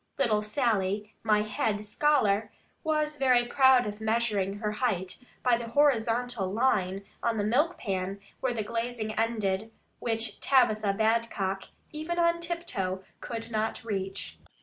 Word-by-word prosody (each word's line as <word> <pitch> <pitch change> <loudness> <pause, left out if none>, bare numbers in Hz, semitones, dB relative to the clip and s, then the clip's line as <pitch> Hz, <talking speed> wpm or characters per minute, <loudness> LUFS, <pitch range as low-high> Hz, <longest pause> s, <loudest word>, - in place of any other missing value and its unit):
Little 225 -6 +2
Sally, 210 -3 0
my 210 -1 +3
head 210 0 -1
scholar, 215 -4 +2 0.3
was 305 -1 0
very 255 -3 +4
proud 260 0 +5
of 210 +1 -5
measuring 220 -3 0
her 210 0 -2
height, 205 -5 -1 0.3
by 245 -2 +4
the 235 0 -6
horizontal 235 -5 +2
line 195 -4 +1 0.2
on 230 -1 0
the 205 - +1
milk 295 +11 +2
pan 195 -1 -3 0.2
where 260 - 0
the 225 -3 -2
glazing 230 0 -3
ended; 220 -2 -1 0.3
which 225 -1 -2
Tabitha 215 -6 +3
Badcock, 220 -3 0 0.2
even 315 +3 -4
on 340 0 +3
tiptoe, 245 - -3 0.2
could 230 -1 -6
not 220 0 -1
reach. 195 -3 -4
225 Hz, 135 wpm, -29 LUFS, 205-250 Hz, 0.3 s, proud